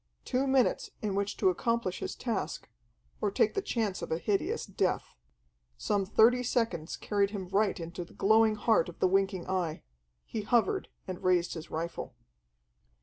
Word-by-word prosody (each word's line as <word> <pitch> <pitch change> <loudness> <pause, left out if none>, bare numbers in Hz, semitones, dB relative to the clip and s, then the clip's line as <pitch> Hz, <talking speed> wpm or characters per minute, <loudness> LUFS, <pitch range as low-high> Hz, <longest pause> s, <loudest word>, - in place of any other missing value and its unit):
Two 260 +2 0
minutes 265 -2 +2
in 205 -2 0
which 200 +1 -1
to - - +4
accomplish 230 0 -1
his - - -4
task, 230 -5 -3 0.5
or 205 - +2
take 210 +2 +2
the - - 0
chance 220 - -1
of - - -5
a 160 - +1
hideous 200 +3 -1
death. - - -1 0.6
Some 195 - 0
thirty 230 +4 +5
seconds 225 -10 -1
carried 200 -1 +1
him 195 -3 -6
right 200 0 +1
into 170 +1 -5
the 170 - -16
glowing 220 +1 +4
heart 210 -4 +2
of 170 - -11
the - - +3
winking 195 -1 +1
Eye: 180 -4 -2 0.4
he 220 - -4
hovered 220 -1 +1 0.2
and 185 -1 -6
raised 180 -1 +2
his 160 -2 -7
rifle. 165 +2 -4
200 Hz, 165 wpm, -30 LUFS, 180-225 Hz, 0.6 s, thirty